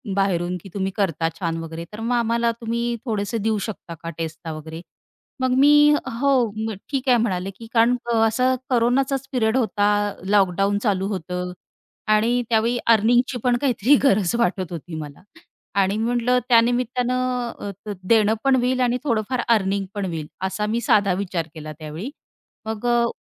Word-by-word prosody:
बाहेरून, 180 Hz, -2 st, 0 dB
की 195 Hz, -, -10 dB
तुम्ही 195 Hz, -1 st, -2 dB
करता 165 Hz, -5 st, 0 dB
छान 165 Hz, -3 st, -2 dB
वगैरे, 165 Hz, +1 st, -7 dB
तर 215 Hz, -, -7 dB
मग 235 Hz, +2 st, 0 dB
आम्हाला 235 Hz, 0 st, +1 dB
तुम्ही 235 Hz, +1 st, -1 dB
थोडेसे 215 Hz, 0 st, -2 dB
देऊ 220 Hz, -, +1 dB
शकता 185 Hz, -5 st, -7 dB
का 165 Hz, -, -4 dB
टेस्टला 160 Hz, 0 st, -5 dB
वगैरे." 160 Hz, +2 st, -8 dB, 0.6 s
मग 260 Hz, -, +2 dB
मी 285 Hz, +2 st, +6 dB, 0.5 s
"हो, 280 Hz, +1 st, +2 dB, 0.6 s
ठीक 270 Hz, -1 st, -2 dB
आहे 245 Hz, -, +6 dB
म्हणाले," 195 Hz, -4 st, -1 dB
की 230 Hz, -, -11 dB
कारण 235 Hz, +2 st, +4 dB, 0.3 s
असं 255 Hz, +4 st, +2 dB
कोरोनाचाच 260 Hz, +2 st, +1 dB
पिरियड 230 Hz, -2 st, +1 dB
होता. 210 Hz, -4 st, +1 dB, 0.4 s
लॉकडाऊन 195 Hz, 0 st, +2 dB
चालू 195 Hz, -4 st, +1 dB
होतं 180 Hz, -2 st, -4 dB, 0.6 s
आणि 235 Hz, +3 st, +2 dB
त्यावेळी 230 Hz, +2 st, +2 dB, 0.2 s
अर्निंगची 245 Hz, +4 st, +2 dB
पण 245 Hz, -1 st, +3 dB
काहीतरी 255 Hz, 0 st, +3 dB
गरज 200 Hz, -5 st, +3 dB
वाटत 190 Hz, -7 st, 0 dB
होती 170 Hz, 0 st, -7 dB
मला 145 Hz, -1 st, -10 dB, 0.6 s
आणि 195 Hz, +2 st, +1 dB
म्हटलं 240 Hz, +2 st, +1 dB
त्या 230 Hz, -1 st, +7 dB
निमित्तानं 250 Hz, 0 st, -1 dB
अ, 205 Hz, -, -5 dB, 0.3 s
देणं 215 Hz, +1 st, +4 dB
पण 270 Hz, -1 st, +4 dB
होईल 255 Hz, +1 st, +1 dB
आणि 245 Hz, 0 st, +2 dB
थोडंफार 240 Hz, -1 st, 0 dB
अर्निंग 200 Hz, -3 st, +2 dB
पण 200 Hz, -1 st, -2 dB
होईल, 160 Hz, -4 st, -4 dB, 0.2 s
असा 210 Hz, +2 st, -2 dB
मी 225 Hz, +3 st, -1 dB
साधा 200 Hz, -4 st, +3 dB
विचार 170 Hz, -4 st, -3 dB
केला 155 Hz, 0 st, -7 dB
त्यावेळी. 155 Hz, -, -6 dB, 0.6 s
मग 220 Hz, +1 st, -4 dB
अ 240 Hz, 0 st, +3 dB
220 Hz, 160 wpm, -22 LUFS, 190-245 Hz, 0.6 s, त्या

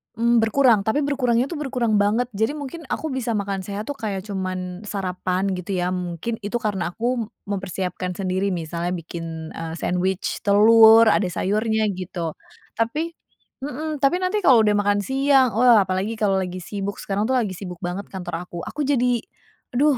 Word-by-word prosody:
Mmm, 235 Hz, +1 st, +3 dB
berkurang. 225 Hz, -1 st, +4 dB
Tapi 285 Hz, +6 st, +2 dB
berkurangnya 255 Hz, -3 st, +1 dB
itu 335 Hz, -, -4 dB
berkurang 245 Hz, -7 st, 0 dB
banget. 220 Hz, +4 st, +1 dB
Jadi 220 Hz, +7 st, 0 dB
mungkin 295 Hz, +3 st, -7 dB
aku 315 Hz, 0 st, -3 dB
bisa 245 Hz, -3 st, -2 dB
makan 200 Hz, -1 st, -2 dB
sehat 205 Hz, +1 st, -4 dB
tuh 285 Hz, -, -4 dB
kayak 195 Hz, -4 st, -3 dB
cuman 185 Hz, -1 st, -4 dB
sarapan, 185 Hz, -1 st, -2 dB
gitu 180 Hz, +2 st, -5 dB
ya, 180 Hz, -, 0 dB
mungkin. 180 Hz, +5 st, -4 dB
Itu 205 Hz, +3 st, -2 dB
karena 195 Hz, -6 st, -2 dB
aku 235 Hz, -1 st, -1 dB, 0.2 s
mempersiapkan 185 Hz, -2 st, -3 dB
sendiri, 190 Hz, +1 st, -1 dB
misalnya 170 Hz, +1 st, -3 dB
bikin, 165 Hz, -1 st, -7 dB
eee, 165 Hz, 0 st, -5 dB
sandwich 180 Hz, +2 st, -1 dB
telur, 225 Hz, +2 st, +7 dB
ada 200 Hz, -, +2 dB
sayurnya, 215 Hz, +4 st, 0 dB
gitu. 180 Hz, -3 st, -4 dB, 0.5 s
Tapi 300 Hz, +9 st, -1 dB, 0.5 s
mhm, 300 Hz, +3 st, -4 dB
tapi 290 Hz, +6 st, +2 dB
nanti 370 Hz, +3 st, 0 dB
kalau 245 Hz, -4 st, +7 dB
udah 210 Hz, -1 st, +3 dB
makan 205 Hz, 0 st, +2 dB
siang, 270 Hz, +2 st, +3 dB
oh 235 Hz, -3 st, +6 dB
apalagi 190 Hz, +3 st, -1 dB
kalau 205 Hz, -3 st, +1 dB
lagi 185 Hz, -1 st, -3 dB
sibuk, 200 Hz, +2 st, -5 dB
sekarang 200 Hz, +1 st, -1 dB
tuh 260 Hz, -, 0 dB
lagi 215 Hz, -8 st, 0 dB
sibuk 180 Hz, -2 st, -8 dB
banget 180 Hz, +3 st, -4 dB
kantor 180 Hz, -2 st, -6 dB
aku, 175 Hz, -1 st, -7 dB
aku 295 Hz, +9 st, -4 dB
jadi, 250 Hz, -3 st, +2 dB, 0.6 s
aduh 280 Hz, +2 st, +3 dB
205 Hz, 170 wpm, -23 LUFS, 185-245 Hz, 0.6 s, telur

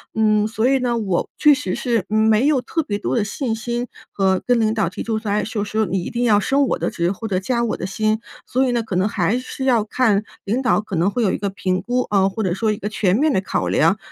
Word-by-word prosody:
嗯， 215 Hz, -1 st, +3 dB
所 225 Hz, +2 st, 0 dB
以 270 Hz, 0 st, +3 dB
呢， 245 Hz, -2 st, 0 dB
我 195 Hz, -6 st, -1 dB
确 300 Hz, -1 st, +6 dB
实 290 Hz, -, -2 dB
是 230 Hz, -6 st, 0 dB
没 220 Hz, +3 st, +3 dB
有 295 Hz, -4 st, +3 dB
特 320 Hz, +6 st, -2 dB
别 205 Hz, -5 st, -3 dB
多 -, -, -2 dB
的 225 Hz, -, +2 dB
信 225 Hz, +2 st, -2 dB
心 240 Hz, +2 st, -3 dB, 0.2 s
和 190 Hz, -2 st, +1 dB
跟 245 Hz, -1 st, +3 dB
领 220 Hz, 0 st, +2 dB
导 210 Hz, -6 st, 0 dB
提 -, -, -7 dB
出 225 Hz, -1 st, -1 dB
说 215 Hz, -2 st, -3 dB
哎 210 Hz, 0 st, +1 dB
说 215 Hz, -2 st, -3 dB
说 215 Hz, +1 st, 0 dB
你 180 Hz, -1 st, -2 dB
一 -, -, -5 dB
定 240 Hz, +1 st, -1 dB
要 210 Hz, -3 st, +4 dB
升 275 Hz, +2 st, +2 dB
我 -, -, 0 dB
的 -, -, -1 dB
职 175 Hz, -3 st, -1 dB
或 225 Hz, +3 st, -6 dB
者 185 Hz, -2 st, +1 dB
加 235 Hz, +4 st, -1 dB
我 230 Hz, -, -1 dB
的 -, -, -4 dB
薪。 215 Hz, +3 st, 0 dB, 0.3 s
所 260 Hz, +2 st, +1 dB
以 -, -, +1 dB
呢， 235 Hz, -1 st, 0 dB
可 195 Hz, -5 st, -3 dB
能 185 Hz, +2 st, +2 dB
还 205 Hz, +2 st, 0 dB
是 255 Hz, +1 st, -7 dB
要 240 Hz, -5 st, +3 dB
看 220 Hz, -3 st, +1 dB, 0.2 s
领 235 Hz, +6 st, -1 dB
导 250 Hz, -4 st, +2 dB
可 205 Hz, -3 st, -6 dB
能 175 Hz, +5 st, +2 dB
会 240 Hz, +3 st, -1 dB
有 195 Hz, -, +2 dB
一 -, -, -1 dB
个 200 Hz, -1 st, -2 dB
评 190 Hz, -1 st, -2 dB
估 245 Hz, +4 st, 0 dB
啊， 195 Hz, -2 st, +3 dB
或 210 Hz, +3 st, -3 dB
者 180 Hz, -, 0 dB
说 215 Hz, +3 st, 0 dB
一 -, -, -5 dB
个 210 Hz, -, -4 dB
全 200 Hz, -3 st, +1 dB
面 300 Hz, +4 st, +2 dB
的 190 Hz, -, +2 dB
考 190 Hz, -, -2 dB
量。 -, -, +3 dB
220 Hz, 300 characters per minute, -20 LUFS, 200-240 Hz, 0.3 s, 确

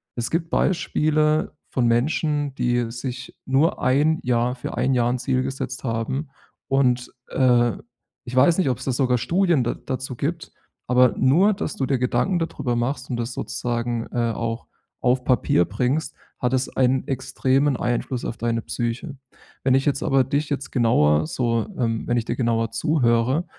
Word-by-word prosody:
Es 120 Hz, -1 st, -3 dB
gibt 165 Hz, 0 st, -1 dB
Beispiele 155 Hz, -4 st, +1 dB, 0.2 s
von 125 Hz, -2 st, +1 dB
Menschen, 145 Hz, +3 st, 0 dB
die 120 Hz, -2 st, 0 dB
sich 125 Hz, +1 st, -6 dB
nur 135 Hz, +5 st, +2 dB
1 145 Hz, +5 st, +2 dB
Jahr 125 Hz, 0 st, +1 dB
für 125 Hz, -, -6 dB
1 130 Hz, +2 st, +2 dB
Jahr 120 Hz, -1 st, +2 dB
'n 125 Hz, +1 st, -1 dB
Ziel 130 Hz, +1 st, 0 dB
gesetzt 130 Hz, -1 st, -5 dB
haben 130 Hz, +5 st, -2 dB, 0.4 s
und, 125 Hz, -2 st, +1 dB, 0.2 s
äh, 120 Hz, -3 st, +3 dB, 0.5 s
ich 125 Hz, 0 st, -6 dB
weiß 165 Hz, +6 st, +5 dB
nicht, 185 Hz, -8 st, +2 dB
ob's 125 Hz, -, -2 dB
da 135 Hz, -, 0 dB
sogar 125 Hz, -1 st, +2 dB
Studien 175 Hz, -, +2 dB
da 120 Hz, -, -1 dB
dazu 130 Hz, -1 st, -5 dB
gibt, 160 Hz, +7 st, -3 dB, 0.4 s
aber 125 Hz, 0 st, +4 dB
nur, 175 Hz, +11 st, +4 dB
dass 190 Hz, -5 st, -4 dB
du 135 Hz, -, -1 dB
dir 130 Hz, -1 st, 0 dB
Gedanken 125 Hz, +9 st, +1 dB
dadrüber 140 Hz, -7 st, -2 dB
machst 125 Hz, +2 st, -2 dB
und 125 Hz, -, -2 dB
das 120 Hz, +1 st, -3 dB
sozusagen, 120 Hz, -2 st, -3 dB
äh, 120 Hz, -1 st, 0 dB
auch 115 Hz, +1 st, -4 dB, 0.3 s
auf 125 Hz, +1 st, +2 dB
Papier 125 Hz, -8 st, +2 dB
bringst, 130 Hz, +8 st, -1 dB, 0.2 s
hat 125 Hz, 0 st, 0 dB
es 130 Hz, 0 st, 0 dB
einen 130 Hz, 0 st, +2 dB
extremen 135 Hz, +1 st, +1 dB
Einfluss 120 Hz, +1 st, -2 dB
auf 120 Hz, -, -4 dB
deine 115 Hz, 0 st, -1 dB
Psyche. 120 Hz, +6 st, -4 dB, 0.5 s
Wenn 130 Hz, -1 st, +3 dB
ich 135 Hz, -, +1 dB
jetzt 145 Hz, -1 st, +1 dB
aber 135 Hz, -3 st, +3 dB
dich 140 Hz, +3 st, -1 dB
jetzt 140 Hz, -1 st, -3 dB
genauer 75 Hz, -, +3 dB
so, 115 Hz, +3 st, -1 dB
ähm 115 Hz, -3 st, -1 dB
wenn 120 Hz, -, +1 dB
ich 115 Hz, -, -1 dB
dir 120 Hz, -, -2 dB
genauer 115 Hz, -2 st, 0 dB
zuhöre, 125 Hz, +3 st, +1 dB
130 Hz, 170 wpm, -23 LUFS, 120-140 Hz, 0.5 s, weiß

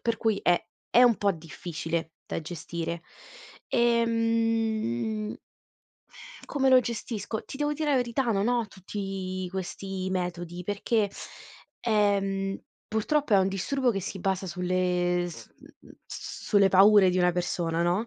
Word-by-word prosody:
per 230 Hz, -1 st, 0 dB
cui 220 Hz, -3 st, +1 dB
è 175 Hz, -, +3 dB, 0.3 s
è 245 Hz, -, +8 dB
un 240 Hz, -3 st, +6 dB
po' 200 Hz, -1 st, +2 dB
difficile 165 Hz, 0 st, -5 dB
da -, -, -4 dB
gestire. 170 Hz, +1 st, -5 dB, 0.7 s
Ehm 225 Hz, -, +1 dB, 1.1 s
Come 270 Hz, -2 st, +1 dB
lo 260 Hz, -1 st, +8 dB
gestisco? 225 Hz, -2 st, -4 dB
Ti -, -, -8 dB
devo 295 Hz, +1 st, 0 dB
dire 300 Hz, 0 st, -1 dB
la 275 Hz, -, +4 dB
verità, 245 Hz, +1 st, 0 dB
non 200 Hz, +1 st, +1 dB
ho 240 Hz, -3 st, +1 dB
tutti 190 Hz, -1 st, -5 dB
questi 190 Hz, 0 st, -4 dB
metodi, 175 Hz, -1 st, -3 dB
perché, 205 Hz, +2 st, 0 dB, 0.7 s
ehm, 195 Hz, -3 st, +1 dB, 0.3 s
purtroppo 230 Hz, +4 st, 0 dB
è -, -, +7 dB
un 190 Hz, 0 st, +3 dB
disturbo 250 Hz, +7 st, 0 dB
che 195 Hz, -, -2 dB
si 190 Hz, 0 st, -6 dB
basa 190 Hz, 0 st, -1 dB
sulle 180 Hz, 0 st, 0 dB
s 170 Hz, -, -10 dB
m -, -, -19 dB
m -, -, -18 dB, 0.2 s
sulle 200 Hz, -2 st, +1 dB
paure 195 Hz, 0 st, +7 dB
di 185 Hz, -, 0 dB
una 180 Hz, 0 st, +3 dB
persona, 170 Hz, -1 st, -1 dB
no. 180 Hz, +7 st, +1 dB
195 Hz, 140 wpm, -27 LUFS, 180-225 Hz, 1.1 s, è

